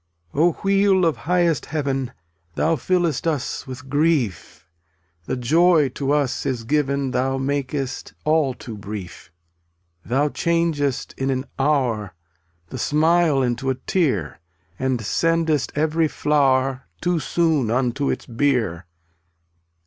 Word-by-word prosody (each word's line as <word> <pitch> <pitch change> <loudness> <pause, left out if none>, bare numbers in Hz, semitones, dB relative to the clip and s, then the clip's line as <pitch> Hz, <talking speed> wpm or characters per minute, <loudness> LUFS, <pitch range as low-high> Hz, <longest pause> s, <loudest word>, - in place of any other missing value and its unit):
286 145 - 0 0.2
Oh, - - -17
Wheel 195 -2 +4
of 165 - +2
highest 175 -3 +1
Heaven 135 -4 -2 0.4
Thou 165 +1 +2
flllest 170 0 0
us 145 -2 -2
with 130 0 -8
grief; 140 - 0 0.6
The - - -2
joy 155 +3 +4
to 135 +2 -2
us 140 -4 +1
is 125 -3 -2
given 140 0 0
Thou 130 +1 0
makest 135 0 -3
all 155 -4 +2
too 115 -3 -8
brief; 95 -4 -8 0.7
Thou 140 +5 +1
changest 165 -5 0
in 135 0 0
an 130 0 -1
hour 125 - 0 0.5
The - - -6
smile 155 -2 +3
into 125 +2 -1
a 130 - +1
tear, 125 - -1 0.4
And 130 -2 0
sendest 165 +4 +1
every 160 +2 +2
flower 135 -3 +1
Too 175 -1 0
soon 160 -7 +1
unto 130 +3 0
its - - -2
bier. 115 - 0
140 Hz, 125 wpm, -22 LUFS, 130-160 Hz, 0.7 s, Wheel